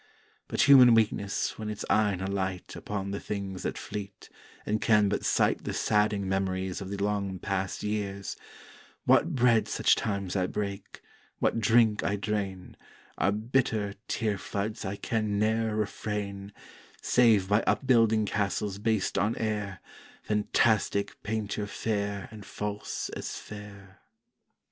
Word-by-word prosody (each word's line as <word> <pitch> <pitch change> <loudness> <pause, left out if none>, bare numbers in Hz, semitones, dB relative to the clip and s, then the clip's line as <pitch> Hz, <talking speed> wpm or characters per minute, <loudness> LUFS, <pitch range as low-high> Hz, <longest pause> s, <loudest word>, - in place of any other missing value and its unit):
But - - +1
human 130 -4 +8
weakness 105 -2 0
when 110 -1 -4
its 105 - -5
eyne 105 -4 +2
alight 95 -1 -3
Upon 100 -1 -4
the 100 - -3
things 100 -2 -5
that - - -3
fleet, 100 -1 -7 0.4
and 105 0 -1
can 105 -3 +4
but - - -1
sight - - +2
The - - -3
sadding 105 -2 +1
Memories 95 0 -1
of 95 - -6
the 100 - -4
long 100 -1 -1
past 95 +1 -3
years; 100 -2 -3 0.7
What 170 -1 +4
bread 120 -3 +4
such - - +3
times 100 -3 -2
I 90 -2 +1
break, 100 -1 -5 0.4
what - - +1
drink 110 -1 +4
I 100 - +1
drain, 100 -3 -3 0.4
Are 100 - +3
bitter 110 -2 0
tear 105 -4 -1
floods 105 +2 -3
I 95 +1 -3
can 110 -1 -1
ne'er 110 +1 +1
refrain, 105 -1 -3 0.5
Save 110 -6 +4
by 105 +3 +3
upbuilding 115 -5 +3
castles 100 -1 -1
based 110 -2 0
on 105 +3 +1
air, 105 -3 -3 0.4
Phantastick 105 -1 +1
painture 105 -1 -3
fair 100 -1 -2
and 110 -2 -10
false 105 +1 -4
as - - -5
fair. 100 -2 -11
105 Hz, 135 wpm, -28 LUFS, 100-110 Hz, 0.7 s, human